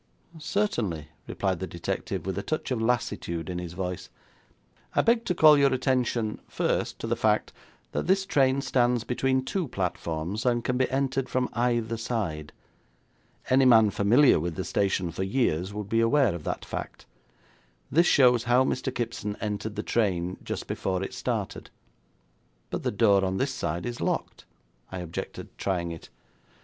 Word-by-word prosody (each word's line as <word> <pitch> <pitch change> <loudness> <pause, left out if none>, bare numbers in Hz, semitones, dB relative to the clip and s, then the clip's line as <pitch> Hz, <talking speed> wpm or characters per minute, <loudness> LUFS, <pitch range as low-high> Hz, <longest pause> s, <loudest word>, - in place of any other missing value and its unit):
'Certainly,' 120 - -1 0.2
replied - - -1
the - - -4
detective, - - -4
with 95 -1 -2
a 100 - -2
touch 155 +4 -3
of 120 -3 0
lassitude 95 -7 -1
in 90 - -3
his 85 -1 -6
voice. 90 0 -4 0.9
'I - - +4
beg 230 0 +3
to 180 - 0
call 155 -3 +7
your 140 -1 +4
attention, 125 -4 0
first, - - -1
to - - -6
the - - 0
fact - - +1 0.4
that - - -2
this 190 +1 +3
train 135 -6 +2
stands 125 -3 +2
between 130 +2 0
two 185 0 -2
platforms, 90 -1 -3
and 120 -2 +1
can 125 +1 0
be 130 0 +1
entered 135 -1 -1
from 125 -1 0
either 120 -1 0
side. 95 -10 -3 1.0
Any 130 +1 +4
man 110 -4 +6
familiar 115 - +5
with 85 +1 -3
the 95 - -3
station 95 -3 0
for 85 - -5
years 95 -4 0
would 105 -1 -5
be 115 +2 +1
aware 120 0 +3
of 85 -3 -7
that - - -3
fact. - - -6 0.9
This 170 +4 +4
shows 125 -3 +5
how 125 +2 +4
Mr. 130 0 -1
Kipson 115 -4 -3
entered 105 0 -3
the 105 - -3
train 90 -5 0
just - - -4
before 95 0 -2
it - - -5
started.' - - -3 1.0
'But - - -2
the - - 0
door 100 -1 +3
on 95 0 0
this 135 +3 0
side 85 -6 -3
is 120 -1 -5
locked,' - - -2 0.5
I 95 - -5
objected, 85 -2 -6
trying 85 -3 -1
it. 85 - -9
115 Hz, 165 wpm, -27 LUFS, 95-130 Hz, 1.0 s, call